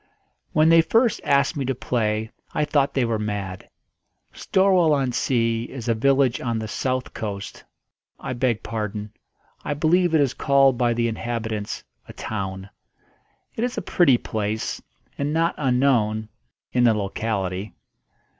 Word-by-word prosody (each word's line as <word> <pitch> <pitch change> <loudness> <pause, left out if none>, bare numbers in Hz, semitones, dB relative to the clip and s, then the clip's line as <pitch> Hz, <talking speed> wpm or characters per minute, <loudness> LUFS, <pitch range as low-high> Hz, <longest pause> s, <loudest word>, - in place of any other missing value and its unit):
When 155 +1 +4
they 165 0 +7
first 225 +8 +2
asked 140 0 +2
me 140 - -2
to 135 0 -1
play 110 -3 -1 0.2
I 150 - +2
thought 145 -2 +1
they 130 -3 +2
were 115 -2 -1
mad. 100 -3 -4 0.6
Storwell 185 -4 +3
on 135 -3 +1
Sea 115 -2 0
is 125 -2 -8
a 115 - +3
village 130 +2 +2
on 120 -2 -1
the 110 0 -4
south 130 +3 -2
coast 100 -2 -6 0.6
I - - -4
beg 120 -3 0
pardon; 105 -2 -4 0.5
I 145 - -2
believe 170 +3 +2
it 155 - +5
is 135 -3 +1
called 135 -2 +4
by 120 -1 +1
the 120 0 +1
inhabitants 115 -2 -4 0.2
a - - -10
town. 95 -2 -5 0.8
It 225 - -2
is 245 0 -2
a - - -2
pretty 140 -9 +4
place, 110 -1 -3 0.4
and 140 +1 -1
not 165 +1 +2
unknown 125 -5 +1 0.4
in 125 - +3
the 115 -2 +5
locality. 100 -1 -3
120 Hz, 150 wpm, -23 LUFS, 110-140 Hz, 0.8 s, they